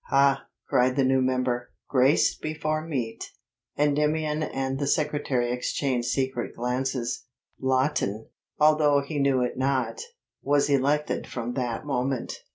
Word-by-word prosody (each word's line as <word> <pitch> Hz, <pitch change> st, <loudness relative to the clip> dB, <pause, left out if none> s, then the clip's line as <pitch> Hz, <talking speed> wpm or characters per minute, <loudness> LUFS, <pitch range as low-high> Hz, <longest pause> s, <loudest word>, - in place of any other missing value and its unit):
"Ha," 135 Hz, 0 st, +3 dB, 0.2 s
cried 125 Hz, +1 st, +3 dB
the 135 Hz, -, +3 dB
new 130 Hz, 0 st, +3 dB
member; 125 Hz, -1 st, 0 dB, 0.2 s
"grace 135 Hz, +2 st, +3 dB
before 155 Hz, 0 st, -2 dB
meat!" 130 Hz, -8 st, -3 dB, 0.5 s
Endymion 150 Hz, +1 st, +1 dB
and 135 Hz, -3 st, -2 dB
the 140 Hz, -, -1 dB
secretary 145 Hz, -5 st, 0 dB
exchanged 125 Hz, 0 st, -1 dB
secret 130 Hz, -3 st, -1 dB
glances. 125 Hz, 0 st, -2 dB, 0.3 s
Lawton, 130 Hz, -5 st, 0 dB, 0.3 s
although 150 Hz, -2 st, +5 dB
he 145 Hz, +1 st, -4 dB
knew 135 Hz, -2 st, +3 dB
it 125 Hz, +1 st, -3 dB
not, 135 Hz, -, 0 dB, 0.4 s
was 145 Hz, 0 st, +2 dB
elected 140 Hz, +2 st, +1 dB
from 120 Hz, 0 st, -4 dB
that 120 Hz, -1 st, -3 dB
moment. 130 Hz, -2 st, -1 dB
135 Hz, 125 wpm, -26 LUFS, 125-145 Hz, 0.5 s, although